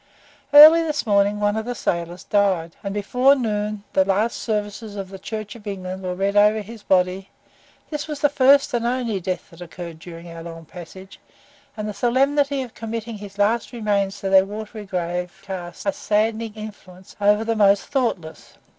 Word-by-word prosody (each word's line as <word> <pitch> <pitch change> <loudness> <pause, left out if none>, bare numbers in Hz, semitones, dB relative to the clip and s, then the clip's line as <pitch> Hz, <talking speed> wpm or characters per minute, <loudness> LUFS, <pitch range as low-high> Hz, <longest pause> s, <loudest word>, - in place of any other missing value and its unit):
Early 305 +3 +10
this 305 -4 -2
morning 205 -1 +2
one 205 0 +1
of 220 0 -3
the 245 0 -4
sailors 170 -1 -3
died, 190 -5 +1
and 200 - -3
before 250 +7 +3
noon 210 -4 -2
the 190 - +4
last 200 +4 0
services 210 -1 -4
of 195 -2 -6
the 195 0 -10
Church 215 +1 -6
of 215 -2 -13
England 190 -1 -5
were 180 -1 -3
read 195 +2 -1
over 210 +1 +4
his 220 +2 -11
body; 185 0 +1 0.6
this 300 0 -4
was 300 -2 -5
the 290 - +4
first 280 -1 +4
and 235 -1 0
only 240 -5 -1
death 185 +1 -4
that 170 +1 -15
occurred 170 -1 -8
during 170 0 -10
our 165 -1 -9
long 165 -1 -9
passage, 185 +3 -12 0.6
and 215 0 -4
the 210 - -4
solemnity 275 +5 +1
of 245 - -11
committing 225 -1 -6
his 200 -1 -10
last 220 +4 +1
remains 205 -3 -1
to 195 - -2
their 190 0 +7
watery 210 +1 -7
grave 180 0 -3
cast 180 -2 -7
a 200 - +1
saddening 220 +2 -1
influence 195 -4 -11
over 210 +1 +4
the 225 0 -1
most 200 -2 +4
thoughtless. 230 - -3
205 Hz, 180 wpm, -22 LUFS, 190-230 Hz, 0.6 s, Early